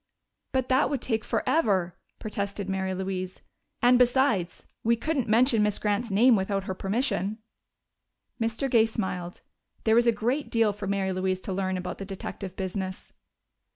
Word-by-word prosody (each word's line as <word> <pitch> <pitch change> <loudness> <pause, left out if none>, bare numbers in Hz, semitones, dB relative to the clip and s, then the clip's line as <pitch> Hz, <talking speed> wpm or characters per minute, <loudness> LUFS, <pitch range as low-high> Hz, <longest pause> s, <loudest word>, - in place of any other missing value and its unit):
"But 260 -1 0
that 260 +2 +3
would 280 - -1
take 225 -1 -1
forever," 200 - +1 0.2
protested 200 -2 -4
Mary 190 -1 -1
Louise. 185 -1 -4 0.4
"And 245 0 +6
besides, 245 -8 +2 0.2
we 235 +1 +3
couldn't 265 0 -1
mention 230 0 +4
Miss 210 -1 +2
Grant's 210 +3 -1
name 230 +5 +5
without 195 0 -1
her 190 - -3
permission." 200 0 -1 1.0
Mr. 225 +4 0
Gay 230 -3 +4
smiled; 180 -5 -4 0.4
there 220 - +3
was 235 +1 +4
a - - +7
great 240 +7 -1
deal 225 -3 +2
for 205 0 -6
Mary 195 -1 0
Louise 185 0 0
to 190 - -4
learn 190 0 -1
about 180 0 -5
the 195 - -5
detective 195 -1 -6
business. 190 0 -5
205 Hz, 155 wpm, -27 LUFS, 190-235 Hz, 1.0 s, a